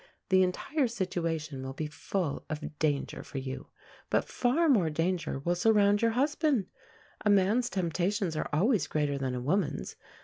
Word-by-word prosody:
The 190 Hz, 0 st, +5 dB
entire 265 Hz, -, +1 dB
situation 165 Hz, -, -3 dB
will 130 Hz, 0 st, -5 dB
be 155 Hz, +3 st, -3 dB
full 150 Hz, +1 st, -3 dB
of 155 Hz, -1 st, -6 dB
danger 145 Hz, -3 st, 0 dB
for -, -, -8 dB
you. 130 Hz, 0 st, -5 dB, 0.4 s
But -, -, +2 dB
far 275 Hz, +7 st, +2 dB
more 205 Hz, -, +4 dB
danger 165 Hz, +1 st, -1 dB
will 170 Hz, +6 st, 0 dB
surround 205 Hz, +2 st, +4 dB
your 230 Hz, -, +4 dB
husband. 290 Hz, -, +2 dB, 0.6 s
A 210 Hz, -, +2 dB
man's 205 Hz, +5 st, +3 dB
temptations 185 Hz, 0 st, -1 dB
are 155 Hz, -, -2 dB
always 180 Hz, -, +2 dB
greater 145 Hz, -2 st, 0 dB
than 130 Hz, -2 st, -2 dB
a -, -, -2 dB
woman's. 150 Hz, -, -1 dB
180 Hz, 160 wpm, -30 LUFS, 150-210 Hz, 0.6 s, The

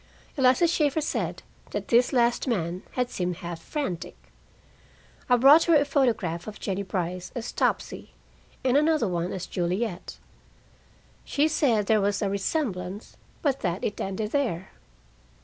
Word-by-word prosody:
Eliza 260 Hz, +4 st, +4 dB
Shaeffer 310 Hz, -3 st, +1 dB
said 305 Hz, -, -2 dB, 0.3 s
that -, -, -5 dB
this 240 Hz, +1 st, +4 dB
last 240 Hz, 0 st, +2 dB
man 180 Hz, -6 st, -1 dB
had 250 Hz, -1 st, -1 dB
seemed 180 Hz, -1 st, -2 dB
half 170 Hz, -1 st, -7 dB
frantic. 230 Hz, -, -4 dB, 1.1 s
I 250 Hz, -, +6 dB
brought 280 Hz, +6 st, +7 dB
her 335 Hz, -, +5 dB
a 290 Hz, -1 st, +4 dB
photograph 225 Hz, -, 0 dB
of 215 Hz, -, -8 dB
Jennie 195 Hz, -1 st, -2 dB
Brice 180 Hz, -2 st, -3 dB
as 240 Hz, -1 st, -4 dB
"Topsy" -, -, -1 dB, 0.5 s
and 260 Hz, +1 st, +4 dB
another 305 Hz, -5 st, +3 dB
one 175 Hz, -1 st, -2 dB
as 190 Hz, -1 st, -4 dB
"Juliet". 180 Hz, +2 st, -3 dB, 1.1 s
She 290 Hz, +2 st, +1 dB
said 250 Hz, -9 st, +2 dB
there 215 Hz, 0 st, +3 dB
was 200 Hz, +1 st, 0 dB
a 195 Hz, -, 0 dB
resemblance, 200 Hz, -, -3 dB, 0.3 s
but 275 Hz, -3 st, +1 dB
that 180 Hz, 0 st, -2 dB
it 205 Hz, -, -2 dB
ended 210 Hz, +3 st, -3 dB
there. 220 Hz, -, -1 dB
215 Hz, 145 wpm, -26 LUFS, 185-270 Hz, 1.1 s, brought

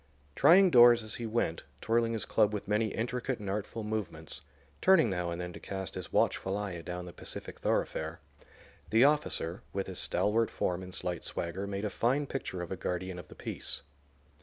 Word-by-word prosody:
Trying 185 Hz, +2 st, +7 dB
doors 120 Hz, -2 st, +8 dB
as 110 Hz, -, -5 dB
he 115 Hz, -, -2 dB
went, 110 Hz, -7 st, 0 dB, 0.2 s
twirling 115 Hz, 0 st, +1 dB
his 110 Hz, -2 st, -1 dB
club 105 Hz, -1 st, +3 dB
with 105 Hz, -, -5 dB
many 105 Hz, +2 st, +2 dB
intricate 125 Hz, +3 st, -2 dB
and 105 Hz, -, -8 dB
artful 105 Hz, +3 st, -3 dB
movements, 105 Hz, -7 st, -4 dB, 0.4 s
turning 185 Hz, -, +5 dB
now 90 Hz, -2 st, -1 dB
and 85 Hz, 0 st, -4 dB
then 90 Hz, 0 st, -5 dB
to -, -, -9 dB
cast 95 Hz, -2 st, -5 dB
his -, -, -6 dB
watchful 95 Hz, +1 st, +1 dB
eye 105 Hz, -2 st, -3 dB
adown 90 Hz, +1 st, -5 dB
the 90 Hz, -, -9 dB
pacific -, -, -8 dB
thoroughfare, -, -, -1 dB, 0.7 s
the 115 Hz, +3 st, +5 dB
officer, 140 Hz, -, +1 dB
with 100 Hz, 0 st, -1 dB
his 95 Hz, -2 st, -3 dB
stalwart 110 Hz, +2 st, +2 dB
form 90 Hz, 0 st, -1 dB
and 90 Hz, 0 st, -5 dB
slight 90 Hz, -2 st, -2 dB
swagger, 95 Hz, +4 st, -4 dB
made 100 Hz, +1 st, -3 dB
a 105 Hz, -, -2 dB
fine 135 Hz, +8 st, +1 dB
picture 95 Hz, -10 st, -4 dB
of 85 Hz, -, -8 dB
a -, -, -1 dB
guardian 90 Hz, 0 st, -3 dB
of 90 Hz, -, -10 dB
the -, -, -13 dB
peace. -, -, -3 dB
105 Hz, 190 wpm, -31 LUFS, 90-115 Hz, 0.7 s, doors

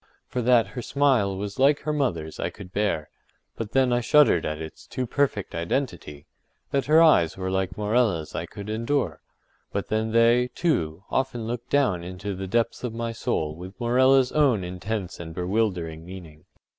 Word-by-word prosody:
For 125 Hz, -, -2 dB
that 120 Hz, -1 st, +4 dB
her 125 Hz, -, -6 dB
smile 125 Hz, -8 st, +2 dB
was 100 Hz, +4 st, -5 dB
like 140 Hz, +2 st, +4 dB
her 150 Hz, -, -2 dB
mother’s 85 Hz, -, -2 dB
I -, -, -1 dB
could 95 Hz, -3 st, -12 dB
bear; 100 Hz, -8 st, 0 dB, 0.5 s
but 110 Hz, -2 st, -6 dB
then 130 Hz, -2 st, +3 dB
I 120 Hz, -, +2 dB
shuddered 150 Hz, +4 st, +4 dB
at 75 Hz, 0 st, -3 dB
its 80 Hz, -1 st, -9 dB
too 130 Hz, -, -3 dB
perfect 125 Hz, -5 st, -1 dB
_identity_—that 85 Hz, -, -4 dB
her 160 Hz, +2 st, +6 dB
eyes 85 Hz, -, +4 dB
were 95 Hz, 0 st, -3 dB
like 95 Hz, -1 st, -1 dB
Morella’s 105 Hz, -6 st, +1 dB
I 85 Hz, +2 st, -4 dB
could 100 Hz, +3 st, -9 dB
endure; 115 Hz, +6 st, -1 dB, 0.5 s
but 100 Hz, -, -3 dB
then 110 Hz, +1 st, 0 dB
they, 120 Hz, +2 st, +4 dB
too, 85 Hz, -, 0 dB
often 130 Hz, -4 st, -1 dB
looked 120 Hz, +1 st, -5 dB
down 115 Hz, -12 st, +2 dB
into 95 Hz, +3 st, -5 dB
the 95 Hz, +1 st, -5 dB
depths 115 Hz, +5 st, 0 dB
of 120 Hz, -2 st, -3 dB
my 115 Hz, 0 st, -2 dB
soul 80 Hz, -8 st, -2 dB
with 90 Hz, +5 st, -10 dB
Morella’s 130 Hz, +2 st, +4 dB
own 135 Hz, -10 st, +3 dB
intense 95 Hz, +2 st, -4 dB
and 80 Hz, -1 st, -8 dB
bewildering 90 Hz, -4 st, -1 dB
meaning. 85 Hz, -4 st, -11 dB
110 Hz, 170 wpm, -25 LUFS, 90-125 Hz, 0.5 s, her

